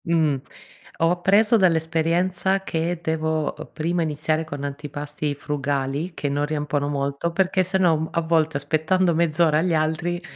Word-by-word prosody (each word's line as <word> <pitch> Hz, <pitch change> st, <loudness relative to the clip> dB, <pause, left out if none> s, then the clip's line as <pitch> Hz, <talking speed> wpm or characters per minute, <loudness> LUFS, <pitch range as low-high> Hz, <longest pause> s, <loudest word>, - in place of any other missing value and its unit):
Mh. 160 Hz, -4 st, +2 dB, 0.6 s
Ho 165 Hz, -, +3 dB
appreso 205 Hz, +6 st, +4 dB
dall'esperienza 175 Hz, +2 st, +1 dB
che 165 Hz, -1 st, -2 dB
devo, 160 Hz, -1 st, -1 dB
uhm, -, -, -9 dB
prima 170 Hz, +2 st, -1 dB
iniziare 155 Hz, +1 st, -1 dB
con 145 Hz, -3 st, -7 dB
antipasti 145 Hz, +1 st, -4 dB
frugali, 145 Hz, +3 st, -2 dB
che 145 Hz, -3 st, -3 dB
non 145 Hz, +1 st, 0 dB
riempiono 150 Hz, -1 st, -1 dB
molto, 140 Hz, +3 st, -2 dB
perché 185 Hz, +1 st, +2 dB
se 185 Hz, +2 st, -1 dB
no 170 Hz, -4 st, +4 dB
m 160 Hz, +1 st, -3 dB
a 170 Hz, -, 0 dB
volte 160 Hz, -2 st, +1 dB
aspettando 160 Hz, +5 st, +1 dB
mezz'ora 160 Hz, -1 st, +3 dB
agli 170 Hz, +1 st, +1 dB
altri, 160 Hz, +3 st, 0 dB
160 Hz, 150 wpm, -23 LUFS, 150-175 Hz, 0.6 s, appreso